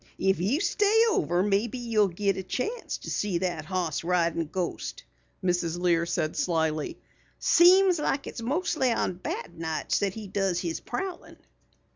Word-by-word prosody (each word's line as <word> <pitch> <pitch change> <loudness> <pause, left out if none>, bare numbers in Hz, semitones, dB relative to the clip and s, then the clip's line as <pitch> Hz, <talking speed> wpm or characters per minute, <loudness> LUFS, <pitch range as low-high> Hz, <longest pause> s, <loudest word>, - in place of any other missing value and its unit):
"If 190 -3 +1
you 225 - +1
stay 420 +2 +3
over 175 - +1
maybe 210 +4 0
you'll 225 -4 +2
git 195 +2 0
a 190 - -3
chance 265 - -3
to - - -7
see 200 -4 0
that 170 -4 -2
hoss 175 -4 -2
ridin' 170 -2 +1
ghost," 180 +2 -4 0.4
Mrs. 175 -2 0
Lear 170 -1 +2
said 155 -2 -1
slyly. 160 -3 0 0.4
"Seems 360 0 +5
like 280 -1 -1
it's - - -7
mostly 270 0 0
on 225 - 0
bad 325 - -6
nights 160 -1 -1
that 195 -1 -1
he 220 -1 -7
does 195 -2 0
his 170 -2 -3
prowlin'." 350 +8 -6
190 Hz, 155 wpm, -27 LUFS, 170-260 Hz, 0.4 s, Seems